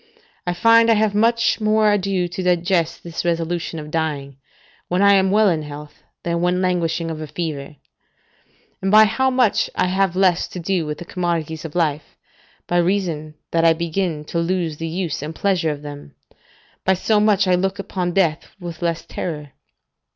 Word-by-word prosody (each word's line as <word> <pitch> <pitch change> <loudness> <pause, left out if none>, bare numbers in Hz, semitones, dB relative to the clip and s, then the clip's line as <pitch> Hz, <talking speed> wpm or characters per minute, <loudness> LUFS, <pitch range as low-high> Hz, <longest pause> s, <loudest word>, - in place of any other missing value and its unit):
I 175 - 0
find 230 +4 +5
I 225 - +6
have 215 -1 +2
much 230 +2 +2
more 215 0 +3
ado 195 -3 0
to 180 +2 -5
digest 175 -1 +1
this 170 -1 -5
resolution 170 0 -2
of 150 -1 -7
dying, 145 -4 -2 0.5
when 180 +3 +1
I 200 0 +7
am 190 -1 +4
well 210 +2 +4
in 165 -4 +1
health, 150 0 -10 0.2
than 170 0 -1
when 180 +1 +1
languishing 170 -2 0
of 155 -1 -6
a 155 - -5
fever; 150 -3 -5 1.1
and 190 - 0
by 215 +2 +8
how 260 +5 +1
much 255 -5 +2
I - - +2
have 190 0 +1
less 185 -2 +2
to 180 - -8
do 175 -2 -1
with 150 0 -4
the 175 - -9
commodities 165 -3 -3
of 160 - -8
life, 155 -4 -1 0.5
by 175 - 0
reason 170 -4 0 0.2
that 165 0 +2
I 165 -1 +6
begin 165 -1 -2
to 170 - -2
lose 170 -2 -1
the 165 - -4
use 165 -3 -3
and 155 +2 -6
pleasure 185 -4 +1
of 150 -1 -5
them, 145 - -9 0.7
by 190 - +3
so 210 +3 +2
much 210 -2 +3
I 185 - +3
look 190 +2 0
upon 180 -3 -3
death 165 -5 +1
with 175 -2 -8
less 170 -1 -1
terror. 150 -5 -5
175 Hz, 185 wpm, -21 LUFS, 160-195 Hz, 1.1 s, by